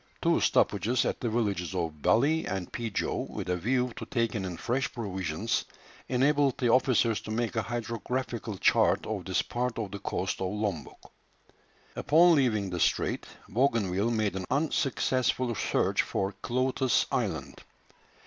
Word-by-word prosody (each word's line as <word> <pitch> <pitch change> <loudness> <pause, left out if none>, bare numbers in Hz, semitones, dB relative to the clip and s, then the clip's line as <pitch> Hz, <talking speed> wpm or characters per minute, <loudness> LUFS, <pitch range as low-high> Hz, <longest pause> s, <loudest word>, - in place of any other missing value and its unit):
Two - - +2
stoppages 110 +5 +2
at - - -1
the 120 - 0
villages 100 -6 -1
of 80 -4 -3
Baly 145 - +3
and 95 -2 -4
Peejow, 115 -4 -2
with - - -5
a 90 - +2
view 125 +6 0
to - - -5
taking 115 -4 -1
in 90 -2 -5
fresh 135 +3 -1
provisions, 95 -3 -2 0.5
enabled 140 +1 +2
the 120 -3 +2
officers 115 -5 +3
to 110 - -9
make 115 +2 -1
a 115 - +2
hydrographical 115 -1 -4
chart - - +3
of - - -4
this - - +1
part 125 0 -2
of 105 -4 -3
the 100 - -6
coast 95 0 -3
of 95 -1 -1
Lombok. 100 -9 -4 0.8
Upon 170 +3 +5
leaving 110 - +1
the 90 - -3
strait, - - 0 0.2
Bougainville 110 -4 +1
made 110 -4 0
an 95 -1 -3
unsuccessful 130 -4 +1
search - - +1
for 95 +1 -2
Cloates 130 +1 +1
Island. - - -2
115 Hz, 150 wpm, -29 LUFS, 100-125 Hz, 0.8 s, Upon